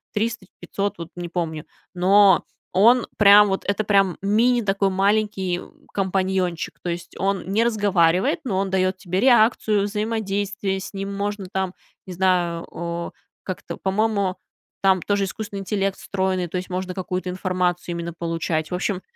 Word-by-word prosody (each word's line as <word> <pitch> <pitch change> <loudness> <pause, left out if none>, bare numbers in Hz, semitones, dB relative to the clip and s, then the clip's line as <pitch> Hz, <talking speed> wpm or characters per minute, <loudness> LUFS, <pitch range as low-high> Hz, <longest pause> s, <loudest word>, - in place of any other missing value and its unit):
300-500, 205 -2 -3
вот 165 -1 -7
не 175 -1 -5
помню. 165 -3 -3 0.3
Но 190 +1 +5 0.3
он 235 +6 +5
прям 205 0 +8
вот, 190 - -1
это 200 +2 0
прям 195 -3 +2
мини 235 +5 +3
такой 195 -1 +1
маленький 195 -2 0 0.3
компаньончик, 190 -3 -1
то 175 - -4
есть 170 0 -6
он 195 -2 -1
не 215 +4 +2
разговаривает, 200 - +2
но 215 -8 -2
он 195 0 -1
дает 185 0 +1
тебе 185 -1 -2
реакцию, 220 -3 +4
взаимодействие, 205 -2 -2
с 190 - -7
ним 195 0 -4
можно 205 0 -3
там, 190 -1 -2 0.3
не 185 - -6
знаю, 175 -2 +1
э, 170 0 -4 0.3
как-то, 185 - -6
по-моему, 200 -1 0 0.4
там 190 -2 +3
тоже 200 -1 +1
искусственный 205 +1 -6
интеллект 195 0 -1
встроенный, 190 -2 -1
то 175 - -4
есть 180 - -5
можно 185 0 -3
какую-то 185 0 -3
информацию 180 -1 -1
именно 170 0 -4
получать. 165 -1 -2
В - - 0
общем, 190 +1 -2
190 Hz, 150 wpm, -23 LUFS, 180-205 Hz, 0.4 s, прям